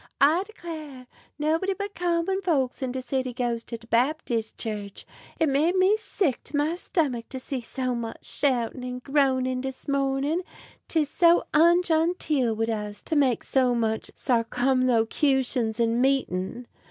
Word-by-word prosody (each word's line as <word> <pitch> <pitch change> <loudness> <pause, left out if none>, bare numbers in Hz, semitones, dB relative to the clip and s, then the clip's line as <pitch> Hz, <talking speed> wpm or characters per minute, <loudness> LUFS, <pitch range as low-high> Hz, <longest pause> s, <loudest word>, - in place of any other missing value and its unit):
I 310 +6 +5
declar' 310 - -8 0.3
nobody 325 +6 0
but 405 +2 -5
common 350 +2 0
folks 280 -10 0
in 260 -1 -1
de 260 0 -4
city 260 -1 -2
goes 235 -1 -2
to 230 - -5
de 230 - -17
Babtiss 235 -2 0
Church. 205 -3 -5 0.3
It 320 - +3
made 300 +6 +2
me 375 +3 +4
sick 375 - -1
't 290 - -4
my 300 +3 +1
stomuck 295 - -1
to 260 - -5
see 260 0 -4
so 255 +1 -3
much 235 -1 -5
shoutin' 250 -3 -1
and 250 0 -5
groanin' 260 -3 +1
dis 265 0 -6
mornin'; 280 +4 0 0.5
'tis 315 -3 +1
so 340 +3 +4
ungenteel 320 -6 +3
wid 225 +1 -1
us 210 -1 -4
to 320 - -2
make 265 -5 +2
so 255 -2 +2
much 220 -1 -1
sarcumlocutions 250 0 +1
in 230 +1 +2
meetin'." 245 -4 0
265 Hz, 150 wpm, -26 LUFS, 240-315 Hz, 0.5 s, I